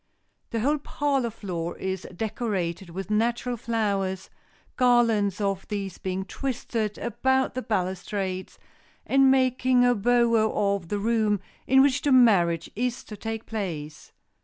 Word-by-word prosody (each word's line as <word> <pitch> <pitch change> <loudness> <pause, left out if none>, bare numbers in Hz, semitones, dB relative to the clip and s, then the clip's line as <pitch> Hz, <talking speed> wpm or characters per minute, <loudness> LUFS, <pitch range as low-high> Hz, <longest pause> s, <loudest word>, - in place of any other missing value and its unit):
The 230 - -2
whole 290 +5 +1
parlor 280 -4 -1
floor 175 -6 -5
is 190 -1 -4
decorated 195 -5 -3
with 190 +4 -6
natural 235 +3 0
flowers, 200 -5 -2 0.4
garlands 230 -6 +3
of 195 -2 -2
these 200 -3 -4
being 190 0 -3
twisted 230 -4 -3
about 265 +2 0
the 255 - -3
balustrades, 190 -2 -3 0.5
and 270 0 +4
making 255 -1 +3
a 245 - +5
bower 230 0 +3 0.3
of 180 -4 -7
the 205 - -2
room 215 -1 +1 0.3
in 265 +1 +6
which 280 0 +2
the 290 - +1
marriage 195 -10 +4
is 245 +2 -2
to 210 - -9
take 225 +2 -5
place. 160 -9 -5
220 Hz, 135 wpm, -26 LUFS, 190-245 Hz, 0.5 s, in